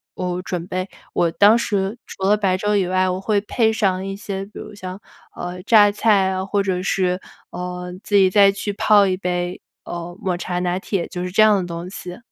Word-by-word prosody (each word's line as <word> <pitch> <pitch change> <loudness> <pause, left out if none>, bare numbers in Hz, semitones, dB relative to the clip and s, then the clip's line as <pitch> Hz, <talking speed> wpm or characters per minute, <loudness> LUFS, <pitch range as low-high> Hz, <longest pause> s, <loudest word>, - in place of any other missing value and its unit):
我 180 -1 -3
准 180 -2 -4
备， 185 +1 -3 0.2
我 170 - +2
当 205 +6 +5
时 205 -3 -1
除 190 - -9
了 205 - +5
白 190 -3 +1
粥 210 +2 0
以 195 -3 +2
外， 185 +1 +2
我 185 0 -2
会 210 0 +1
配 220 +2 +1
上 190 -4 0
一 195 0 -4
些， 195 -2 -5
比 200 - -19
如 215 - -8
像， 185 -2 -7 0.4
呃， 180 +1 -6
榨 205 +1 +6
菜 205 -2 +3
呀， 190 0 -2
或 200 +1 0
者 185 -2 -1
是， 185 -1 0 0.3
呃， 180 0 -5
自 205 - -1
己 195 -1 +6
再 200 0 +6
去 200 +1 -4
泡 205 0 +4
一 185 -1 +1
杯， 180 -1 -3 0.2
呃， 175 +1 -7
抹 185 -2 -1
茶 175 0 -4
拿 180 0 -1
铁， 195 -3 -2
就 180 -2 -5
是 180 - -3
这 215 +4 +5
样 215 -1 +6
的 180 -2 -3
东 170 +1 -6
西。 180 -1 -8
190 Hz, 235 characters per minute, -21 LUFS, 180-205 Hz, 0.4 s, 榨